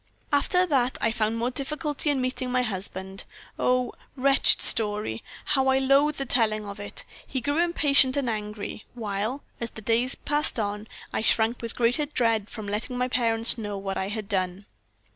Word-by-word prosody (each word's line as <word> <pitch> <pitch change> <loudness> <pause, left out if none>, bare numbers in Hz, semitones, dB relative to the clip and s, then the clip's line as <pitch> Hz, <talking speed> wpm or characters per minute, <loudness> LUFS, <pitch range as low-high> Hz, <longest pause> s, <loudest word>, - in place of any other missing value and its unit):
"After 360 +6 +3
that 265 -6 +1
I 225 - +1
found 220 0 0
more 240 +2 0
difficulty 295 +2 -2
in 285 -2 +1
meeting 255 0 -2
my 250 0 +2
husband. 190 -2 -4 0.4
Oh! 250 0 +1 0.2
wretched 275 +1 +4
story! 210 - +1 0.2
How 265 -2 +2
I 265 0 +4
loathe 275 +3 +3
the 275 - -3
telling 215 -4 +1
of 200 0 -7
it! 205 - -4 0.2
He 260 - -2
grew 285 +5 0
impatient 290 -6 +4
and 275 -3 0
angry, 210 -1 -4
while, 220 +4 -3 0.2
as 235 - -3
the 220 - -11
days 235 +4 +2
passed 295 -1 +2
on, 210 0 -3 0.3
I - - 0
shrank 225 +1 +2
with 230 -1 -4
greater 245 +5 +2
dread 230 -7 +1
from 215 -3 -7
letting 220 +5 -3
my 250 0 0
parents 230 -1 +2
know 205 -2 -4
what 195 0 -4
I 190 - -2
had 210 0 -4
done. 185 0 -2
235 Hz, 180 wpm, -26 LUFS, 210-265 Hz, 0.4 s, wretched